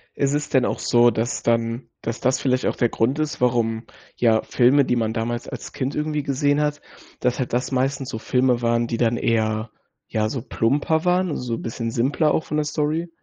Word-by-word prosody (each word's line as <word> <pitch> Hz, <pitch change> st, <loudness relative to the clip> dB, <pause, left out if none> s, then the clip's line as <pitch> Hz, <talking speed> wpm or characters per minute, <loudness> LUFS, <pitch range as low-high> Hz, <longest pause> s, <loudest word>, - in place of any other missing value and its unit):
Ist 140 Hz, 0 st, +1 dB
es 150 Hz, 0 st, -1 dB
denn 130 Hz, -2 st, +3 dB
auch -, -, -2 dB
so, 120 Hz, 0 st, +4 dB
dass 115 Hz, +2 st, -2 dB
dann 115 Hz, +1 st, 0 dB
dass 115 Hz, +1 st, -4 dB
das 130 Hz, +1 st, +2 dB
vielleicht 130 Hz, -1 st, 0 dB
auch -, -, 0 dB
der 120 Hz, -, +2 dB
Grund 130 Hz, +8 st, 0 dB
ist, 155 Hz, -4 st, -2 dB
warum 115 Hz, -2 st, +1 dB, 0.3 s
ja 110 Hz, -2 st, +3 dB
Filme, 130 Hz, +4 st, +4 dB
die 125 Hz, -, +1 dB
man 110 Hz, -2 st, 0 dB
damals 120 Hz, +1 st, -3 dB
als -, -, -7 dB
Kind 135 Hz, +1 st, -3 dB
irgendwie 150 Hz, -1 st, -1 dB
gesehen 145 Hz, +2 st, +1 dB
hat, 150 Hz, 0 st, -1 dB, 0.4 s
dass 125 Hz, 0 st, 0 dB
halt 125 Hz, -, -3 dB
das 125 Hz, +3 st, 0 dB
meistens 135 Hz, +1 st, -1 dB
so -, -, -4 dB
Filme 125 Hz, 0 st, +1 dB
waren, 115 Hz, 0 st, +1 dB
die 115 Hz, -, -2 dB
dann 120 Hz, -1 st, +1 dB
eher, 110 Hz, -1 st, 0 dB, 0.4 s
ja, 110 Hz, -1 st, 0 dB
so 130 Hz, +1 st, -3 dB
plumper 145 Hz, +9 st, 0 dB
waren, 180 Hz, -3 st, +2 dB
so 120 Hz, -2 st, -3 dB
bisschen 115 Hz, 0 st, -4 dB
simpler 140 Hz, +7 st, +1 dB
auch 160 Hz, -, 0 dB
von 150 Hz, -, -2 dB
der 150 Hz, -, +1 dB
Story? 155 Hz, +3 st, -1 dB
125 Hz, 210 wpm, -22 LUFS, 115-145 Hz, 0.4 s, so